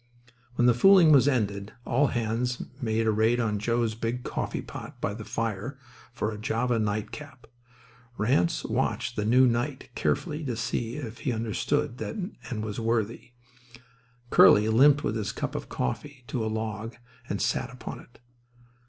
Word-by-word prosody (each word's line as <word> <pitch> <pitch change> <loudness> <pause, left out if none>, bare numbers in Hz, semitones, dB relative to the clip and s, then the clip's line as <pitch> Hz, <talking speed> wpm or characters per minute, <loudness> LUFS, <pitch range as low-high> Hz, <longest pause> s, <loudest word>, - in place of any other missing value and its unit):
When 120 - +2
the 125 - +6
fooling 175 +5 +7
was 140 -2 +6
ended 105 -6 0
all 140 +4 +3
hands 120 +1 -1 0.2
made 115 -1 0
a 110 - +3
raid 110 +3 +2
on 105 -3 0
Joe's 115 +1 0
big 115 +2 -3
coffee - - -3
pot - - -9
by - - -2
the 110 +1 -7
fire 115 +4 -3 0.3
for 110 -2 -2
a 105 - -7
Java 115 +2 0
nightcap. 110 +6 -4 0.7
Ranse 140 +9 +1
watched 125 +1 -1
the 105 - -1
new 125 +4 +5
knight 130 +3 -1
carefully 155 +2 -1
to 125 -4 -2
see 115 +1 -2
if 120 -6 -6
he 130 - -1
understood 125 +5 -1
and 125 - -5
was 105 +1 -4
worthy. 115 +1 -1 1.0
Curly 105 +3 +7
limped 140 +6 +5
with 110 - -1
his 105 -2 -2
cup - - -4
of - - -5
coffee 130 - -4
to 120 - -2
a - - -1
log 110 +1 -4 0.3
and 100 - -2
sat - - 0
upon 125 0 -8
it. 120 - -17
115 Hz, 160 wpm, -27 LUFS, 110-130 Hz, 1.0 s, fooling